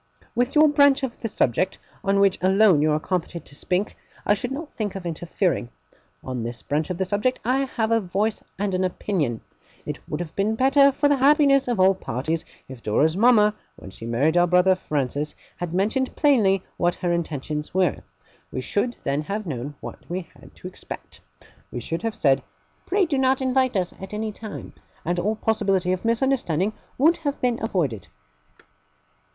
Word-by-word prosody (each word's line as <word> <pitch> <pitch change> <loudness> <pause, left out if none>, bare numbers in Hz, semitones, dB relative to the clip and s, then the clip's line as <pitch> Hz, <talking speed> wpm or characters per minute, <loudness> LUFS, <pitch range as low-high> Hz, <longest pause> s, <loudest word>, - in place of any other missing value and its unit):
With 245 +4 0
your 305 +1 +7
branch 285 -2 +4
of 250 -3 -4
the 225 - -3
subject, 185 - 0 0.3
on 195 0 +2
which 195 -1 +3
alone 190 -3 +5
you 155 0 +3
are 150 - +2
competent 170 -1 -3
to - - -11
speak, 185 +7 -1 0.3
I 205 - +4
should 225 +4 -3
not 300 +3 -5
think 210 -4 -4
of 190 -2 -6
interfering. 170 - -1 0.5
On 130 -2 -4
this 120 +1 -6
branch 150 +4 -1
of 180 - -3
the 190 - 0
subject 210 +7 0
I 265 +3 +2
have 220 -1 0
a 230 0 +3
voice 200 +4 -1 0.2
and 200 -1 -1
an 185 0 +1
opinion. 175 - -1 0.4
It - - -5
would 150 - -3
have 165 -2 -6
been 210 +3 +1
better 275 +3 +5
for 290 +2 +2
the 285 -1 +3
happiness 275 0 +4
of 240 -5 -1
all 190 +1 +6
parties, 160 -1 -3 0.2
if 130 -3 -10
Dora's 150 +10 +2
mama, 210 -1 +5 0.2
when 95 - -11
she 115 - -9
married 140 +9 +2
our 175 0 +5
brother 180 +2 +5
Francis, 150 -4 -2 0.2
had 175 -2 -4
mentioned 220 +9 0
plainly 210 - +3
what 175 0 +1
her 175 -1 -1
intentions 150 -2 -3
were. 185 -1 +2 0.5
We 130 - -3
should 220 - -1
then 140 +2 0
have 200 +7 -4
known 145 -2 -5
what - - -10
we 175 -1 -4
had - - -17
to - - -9
expect. - - -9 0.5
We 125 - -4
should 165 +8 -3
have 225 -1 -2
said 135 -2 +3 0.5
"Pray 385 +1 +2
do 290 -5 -1
not 265 0 +3
invite 260 -3 +1
us, 180 -2 -1
at 195 +2 -6
any 215 0 -2
time"; 210 0 -8 0.3
and 175 +2 0
all 210 +5 0
possibility 195 -5 +1
of 185 - -4
misunderstanding 230 - +1 0.2
would 320 +6 +4
have 290 -3 -3
been 245 -2 0
avoided. 150 - -1
195 Hz, 185 wpm, -24 LUFS, 165-240 Hz, 0.5 s, your